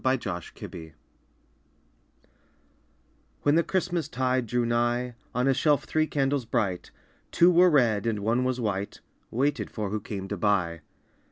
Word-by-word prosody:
THE 130 0 +3
THREE 90 -7 -5 0.2
CANDLES 80 -2 -10 2.5
When 145 - +4
the 165 - +5
Christmas 175 -3 -1
tide 130 -1 0
drew 120 +1 0
nigh, 120 +1 0 0.2
On 125 +1 +1
a 135 - +4
shelf 145 +2 +2
three 155 0 0
candles 140 -3 0
bright, 100 -5 -1 0.4
Two 175 +1 +5
were 180 +1 +6
red 115 -8 +2
and 105 -3 -1
one 115 +4 +1
was 130 0 -1
white, 100 -3 -3 0.3
Waited 140 +5 0
for 105 -3 -4
who 110 - -1
came 100 -2 -6
to 100 - -3
buy. 90 -5 0
120 Hz, 150 wpm, -27 LUFS, 105-140 Hz, 2.5 s, were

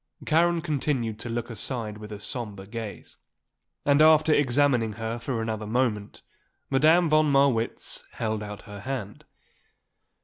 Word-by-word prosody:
Karen 170 +1 +3
continued 135 -8 -1
to 120 - -5
look 120 +1 -3
aside 110 -2 -3
with 105 0 -9
a 105 - -6
sombre 105 -5 -6
gaze. 110 0 -8 0.7
And, 145 +1 +4
after 155 0 +6
examining 125 -5 +2
her 115 +2 -4
for 115 -1 -2
another 110 -1 -3
moment, 110 -3 -1 0.5
Madame 160 +6 +5
von 155 -1 +3
Marwitz 135 -5 +1
held 110 -1 -2
out 105 -1 -7
her 105 -2 -9
hand. 110 -3 -6
120 Hz, 135 wpm, -26 LUFS, 110-145 Hz, 0.7 s, after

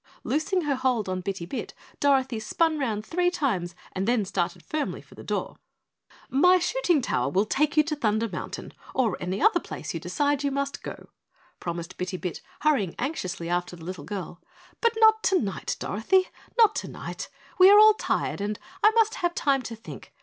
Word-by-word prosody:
Loosing 360 +5 0
her 295 -3 0
hold 255 -5 0
on 185 0 -2
Bitty 190 -2 -4
Bit, 190 - -6 0.2
Dorothy 265 -4 +2
spun 315 +8 +1
round 220 -6 -2
three 355 +5 +1
times 195 - -1 0.2
and 190 +2 -2
then 235 -4 +2
started 180 -2 -2
firmly 305 - -3
for - - -17
the - - -11
door. - - -3 0.7
"My 360 +8 +5
shooting 360 - +1
tower 125 - 0
will 190 +8 +2
take 300 +7 +1
you 305 - +7
to 305 0 -2
Thunder 225 -4 +1
Mountain - - -6 0.2
or 230 -7 +2
any 185 +2 -3
other 435 +6 +4
place - - -6
you - - -3
decide 290 -1 0
you 285 - +2
must 280 0 -3
go," - - -8 0.5
promised 170 +1 -5
Bitty 185 0 -3
Bit, 180 -2 -5 0.2
hurrying 265 - +2
anxiously 190 - -3
after 175 +1 -1
the 165 -2 -12
little 180 -4 -6
girl, 185 -1 -6 0.4
"but 465 -1 +3
not 440 -1 +6
tonight, 255 - 0
Dorothy 370 - +1 0.3
not 445 -3 +6
tonight. - - -5 0.3
We 370 +1 +9
are 410 - +8
all 430 0 +9
tired 410 - -1
and 210 +1 -2 0.3
I 425 - +9
must 445 -1 +4
have 350 0 0
time 275 -2 +2
to 235 -2 -6
think. 225 - -11
260 Hz, 185 wpm, -26 LUFS, -, 0.7 s, We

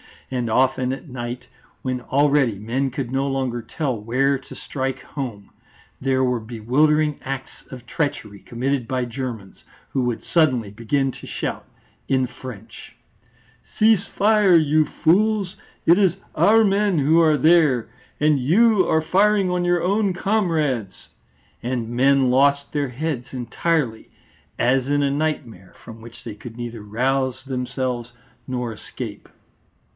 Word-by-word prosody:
And 125 -3 -2
often 130 +2 +2
at 140 +3 -9
night, 120 -1 -6 0.4
when 130 -1 -2
already 140 -4 +2
men 120 +7 -1
could 130 -1 -5
no 135 +1 0
longer 130 -3 -2
tell 130 -3 -3
where 130 +5 +1
to 130 - -13
strike 135 -1 -4
home, 120 -8 -7 0.5
there 130 0 +1
were 125 -2 +1
bewildering 140 +7 +1
acts 135 0 -5 0.2
of 125 -2 -10
treachery 110 -7 -3
committed 125 +2 -2
by 130 0 -1
Germans, 120 -5 -6 0.3
who 135 - 0
would 120 -2 -2
suddenly 130 - +1
begin 135 +5 -1
to - - -12
shout - - -4 0.4
in 130 -1 +1
French: 120 -4 -11 0.8
"Cease 215 -3 +4
fire, 210 -3 +4
you 155 -1 +4
fools! 195 +5 +1 0.3
It 170 +4 +6
is 190 -4 +3 0.2
our 225 +2 +5
men 200 -2 +2
who 155 +3 +4
are 155 -2 +4
there 150 -5 +4 0.3
and 150 -1 +3
you 200 - +4
are 160 - +3
firing 195 +3 +2
on 180 0 0
your 175 -1 +2
own 200 +1 +1
comrades." 160 - -1 0.5
And 120 -2 -3
men 130 +1 +3
lost 140 +2 +3
their 145 -3 -1
heads 135 -1 -3
entirely, 125 -1 -1 0.5
as 130 +1 +2
in 145 0 +1
a 140 - +1
nightmare, 140 - -3
from 115 -1 -11
which 115 +1 -13
they 110 -3 -7
could 115 +2 -10
neither 120 -2 -6
rouse 130 +4 -1
themselves 125 -2 -3 0.3
nor 125 -3 -3
escape. 105 - -8
135 Hz, 140 wpm, -22 LUFS, 120-155 Hz, 0.8 s, It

